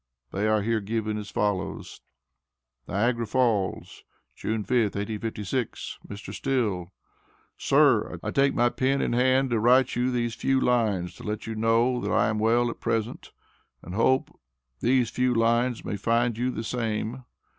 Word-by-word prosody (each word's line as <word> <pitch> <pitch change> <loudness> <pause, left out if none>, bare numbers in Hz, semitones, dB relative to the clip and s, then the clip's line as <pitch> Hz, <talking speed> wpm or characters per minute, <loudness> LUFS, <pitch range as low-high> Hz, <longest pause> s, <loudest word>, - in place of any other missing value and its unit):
They 105 +3 -1
are 110 -1 +2
here 115 0 0
given 110 +1 -2
as 105 -1 -7
follows: 100 -2 -2 0.9
NIAGARA 115 +3 0
FALLS, 110 -5 0 0.3
June 110 -1 -2
5th, 115 -3 +1
1856. 110 +3 -4
MR. 100 -1 -8
STILL: 105 -7 -1 0.6
Sir - - +3
I - - -2
take 140 0 +2
my 120 +1 +3
pen 135 +3 0
in - - -1
hand 130 +1 +2
to 115 - +2
write 125 +3 +4
you 125 +1 +1
theas 120 -2 -1
few 135 +2 +1
lines 110 -9 +1
to - - -11
let 105 0 -4
you 115 - -4
know 115 +3 +2
that - - -3
I - - +3
am 105 -1 -1
well 120 +2 +2
at - - -11
present 115 +1 -2 0.5
and 90 - -8
hope 115 +5 +2 0.5
theas 125 -1 +2
few 125 -1 +1
lines 115 +1 +1
may 105 - -3
find 115 +3 +1
you 125 +3 -1
the 115 -3 -4
same. 115 +1 -3
115 Hz, 155 wpm, -26 LUFS, 105-125 Hz, 0.9 s, write